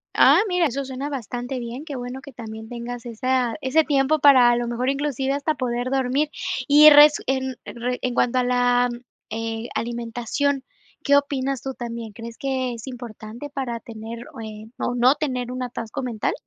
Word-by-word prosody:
Ah, - - +7
mira, 360 -2 +2
eso 275 -1 -1
suena 265 +2 -5
bastante 250 -1 -4
bien, 245 +5 -6
qué 290 - -6
bueno 250 +1 -6
que 280 -1 -12
también 220 -1 -8
tengas 240 0 -6
esa 245 +1 0
ese 265 +5 +3
tiempo 290 +1 +2
para, 260 -4 +7
a 240 - +4
lo 240 0 -1
mejor, 240 +2 -1
inclusive 275 -1 -1
hasta 285 +2 0
poder 245 0 -2
dormir. 270 +3 +1 0.4
Y 300 +1 +9
resu 295 0 +8
en 265 0 -1
re 245 +1 -4
en 250 - -1
cuanto 250 +1 +2
a - - +2
la, 245 0 +3 0.4
eh, 225 +1 -4
alimentación, 240 +4 -2 0.4
¿qué 285 - +4
opinas 275 -2 0
tú 265 0 -4
también? 235 -2 -6
¿Crees 230 +2 -9
que 260 -2 -2
es 230 +3 -9
importante 240 +1 -8
para 260 -4 -3
tener, 230 +1 -8
o - - -8
eh, 215 -1 -8
o 245 - -1
no 245 +2 +5
tener 255 -5 -3
un 255 0 -4
atasco 240 0 -5
mental? 235 -5 -2
250 Hz, 180 wpm, -23 LUFS, 235-275 Hz, 0.4 s, Y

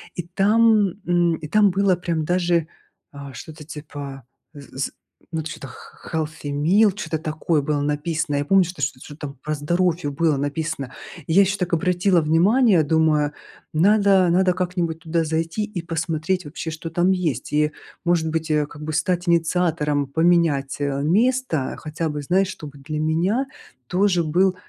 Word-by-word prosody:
И 175 - -3
там, 210 +4 +3 0.2
м, 175 -1 +2
и 155 -1 -8
там 205 +4 +4
было 195 0 +2
прям 170 -2 -2
даже, 175 -1 +1 0.4
а, 140 -1 -9
что-то 155 +6 -10
типа 145 -3 -8 0.3
з 145 -2 -12
з 135 - -1 0.4
ну 160 -1 -2
т 155 - -6
что-то 135 - -8
х 120 - -12 0.3
х 160 - -2
healthy 155 -2 -4
meal 190 +9 +4
чё-то 160 -5 -3
такое 155 0 -1
было 145 0 -1
написано. 150 +2 -1
Я 145 - -1
помню, 195 +4 +5
что 175 -3 -7
шт 130 -1 -2
что-то 145 0 -12
там 140 0 -11
про 155 - -2
здоровье 170 +1 0
было 150 +1 +1
написано. 145 -2 -3 0.3
Я 170 +5 +5
ещё 195 +1 +1
так 180 -2 -3
обратила 180 +1 +2
внимание, 180 +5 +4
думаю: 155 -1 +2 0.4
"Надо 195 +2 +4
надо 180 +1 +3
как-нибудь 175 -3 -2
туда 165 0 -1
зайти 165 +5 -1
и 210 -4 -5
посмотреть 165 +2 -2
вообще, 160 +2 -6
что 160 +1 -6
там 175 +3 +2
есть". 175 -10 -2
И 150 0 +2 0.3
может 170 -2 +2
быть, 160 0 -2
э, 150 -1 +2
как 150 +1 -11
бы 155 +1 -4
стать 175 +2 0
инициатором 165 -4 +1
поменять, 160 -3 +2
э, 140 -1 -1
место. 210 - +1
Хотя 155 +1 -3
бы 150 0 -4
знать, 185 +7 +2
чтобы 145 -6 -9
для 150 +2 -5
меня 175 - +1 0.4
тоже 180 0 +2
был 180 +4 +2
165 Hz, 170 wpm, -22 LUFS, 150-180 Hz, 0.4 s, помню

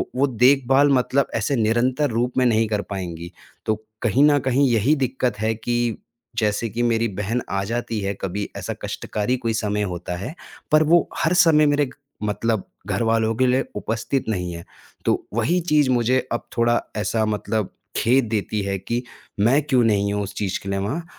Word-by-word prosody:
वो 135 +2 +3
देखभाल 135 +3 +4
मतलब 130 +2 +2
ऐसे 115 +5 0
निरंतर 125 +5 +1
रूप 120 +2 -1
में 130 - +4
नहीं 115 -2 +3
कर 105 -1 -1
पाएँगी। 85 -3 -5 0.3
तो 110 - +1 0.3
कहीं 120 +4 +3
न 145 -1 +5
कहीं 135 +1 +2
यही 120 +7 +3
दिक्कत 130 -5 -1
है 110 +1 +1
कि 120 0 -1 0.4
जैसे 105 +1 +1
कि 120 +3 -2
मेरी 115 -1 +2
बहन 110 +4 -1
आ 95 0 -1
जाती 115 0 -2
है 100 0 -1
कभी 100 +2 -3
ऐसा - - -4
कष्टकारी 105 +4 -2
कोई 115 -2 -2
समय 105 -1 -1
होता 90 0 -5
है, 100 - -5 0.4
पर 155 +1 +6
वो 165 +2 +4
हर 165 - +1
समय 155 -3 +5
मेरे 145 0 +3
क - - -13 0.3
मतलब 105 0 0 0.2
घर 100 +3 0
वालों 115 0 +2
के 130 +2 +2
लिए 130 +2 +2
उपस्थित 110 +5 -2
नहीं 90 -4 -2
है। 85 0 -8 0.4
तो - - +1
वही 115 +11 +2
चीज़ 150 -3 +4
मुझे 125 +1 +2 0.2
अब 120 - -2
थोड़ा 120 0 +3 0.2
ऐसा 110 +1 0
मतलब 110 -1 -1 0.3
खेद 130 +2 +3
देती 105 -1 -1
है 100 0 -2
कि, 120 +6 -3 0.4
मैं 125 +8 +4
क्यों 130 -4 +2
नहीं 100 -2 +2
हूँ 105 0 -1
उस 100 0 -7
चीज़ 100 -3 -2
के 100 - -5
लिए 100 0 -1
वहाँ? 140 - -3
115 Hz, 190 wpm, -22 LUFS, 105-130 Hz, 0.4 s, पर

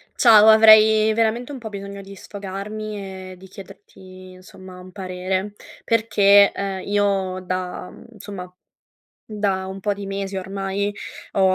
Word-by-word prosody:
Ciao, 220 -3 +6
avrei 220 0 +6
veramente 230 +4 -1
un 275 - -7
po' 225 -3 -8
bisogno 200 0 -8
di 195 0 -12
sfogarmi 200 -1 -8
e - - -11
di 190 +1 -15
chiederti, 185 -1 -14
insomma, 185 0 -14
un 185 0 -13
parere 185 +1 -4 0.3
perché, 205 -3 +4
ehm, 195 -1 -4
io 200 -2 -1
da 185 0 -5 0.2
insomma, 195 -4 -10 0.7
da 200 -3 -2
un 190 +1 -8
po' 205 +2 -1
di 200 0 -8
mesi 195 0 -5
ormai 195 +1 -3 0.4
ho 190 -1 +3
195 Hz, 135 wpm, -21 LUFS, 190-210 Hz, 0.7 s, Ciao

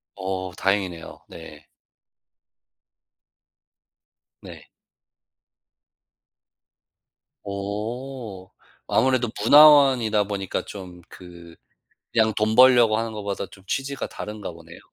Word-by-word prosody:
어 95 -1 -5
다행이네요. 95 -4 -2
네. 80 -3 -13 2.8
네. - - -13 2.8
어. 105 +1 -6 0.4
아무래도 130 -3 +1
문화원이다 135 -6 +6
보니까 100 -2 -4
좀 90 -3 -10
그 85 -2 -14 0.6
그냥 110 -1 +2
돈 110 +1 0
벌려고 120 -4 +6
하는 115 0 -3
거보다 100 -2 -5
좀 95 +1 -18
취지가 135 +4 -4
다른가 105 -3 -8
보네요. 85 0 -14
105 Hz, 175 characters per minute, -23 LUFS, 95-120 Hz, 2.8 s, 문화원이다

